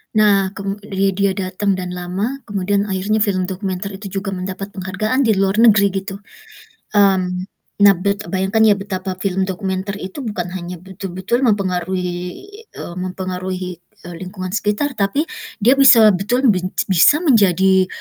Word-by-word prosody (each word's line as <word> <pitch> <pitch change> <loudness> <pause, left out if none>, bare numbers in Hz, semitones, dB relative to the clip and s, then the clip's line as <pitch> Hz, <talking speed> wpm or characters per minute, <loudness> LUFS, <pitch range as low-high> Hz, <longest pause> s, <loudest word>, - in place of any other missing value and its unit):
Nah, 200 -2 +3
kem 200 0 -4
dia 195 -1 -1
dia 195 +1 +1
datang 190 +1 -1
dan 180 -1 -5
lama, 185 +9 -3
kemudian 200 +1 -1
akhirnya 200 +3 0
film 200 -3 +1
dokumenter 190 +1 -4
itu 200 +1 -8
juga 195 0 -5
mendapat 190 +2 -5
penghargaan 200 +6 -2
di 220 - +3
luar 195 +2 +1
negeri, 215 -3 +6
gitu. 195 0 -7 0.8
Mmm, 185 -2 +2 0.4
nah, 200 -1 +8
bet 200 +3 -2
eee, - - -9
bayangkan 195 +3 +1
ya, 210 - +6
betapa 195 -1 -4
film 190 -1 0
dokumenter 190 +1 -3
itu 185 +6 -7
bukan 205 -9 -4
hanya 180 -1 -7
betul-betul 190 +6 -2
mempengaruhi 185 -3 0 0.6
eee, 170 - -8
mempengaruhi, 185 -1 -4 0.2
eee, 175 - -9
lingkungan 185 +1 -6
sekitar, 220 +6 -1
tapi 200 +8 +1 0.4
dia 255 +6 +4
bisa 235 -5 +8
betulan 235 +7 +2
benj 185 -2 -1 0.2
bisa 240 - +5
menjadi, 190 - +4
195 Hz, 150 wpm, -19 LUFS, 185-205 Hz, 0.8 s, nah